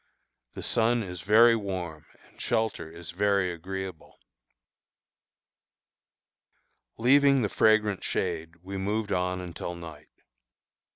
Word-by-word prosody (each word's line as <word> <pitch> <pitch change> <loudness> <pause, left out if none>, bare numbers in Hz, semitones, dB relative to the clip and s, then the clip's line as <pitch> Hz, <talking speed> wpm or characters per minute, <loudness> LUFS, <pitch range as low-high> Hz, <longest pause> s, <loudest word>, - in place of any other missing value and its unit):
The - - -7
sun 115 +1 +2
is 90 -3 -7
very 115 +4 +6
warm 90 -7 -5 0.2
and - - -16
shelter 110 -7 -1
is 85 +1 -9
very 100 -1 +1
agreeable. 95 0 -7 2.8
Leaving 140 +2 +4
the 105 - 0
fragrant 110 -2 +2
shade, 80 +1 -2
we 95 +1 -6
moved 105 +2 -2
on 90 0 0
until 90 -1 -6
night. 80 -3 -11
95 Hz, 105 wpm, -27 LUFS, 85-110 Hz, 2.8 s, very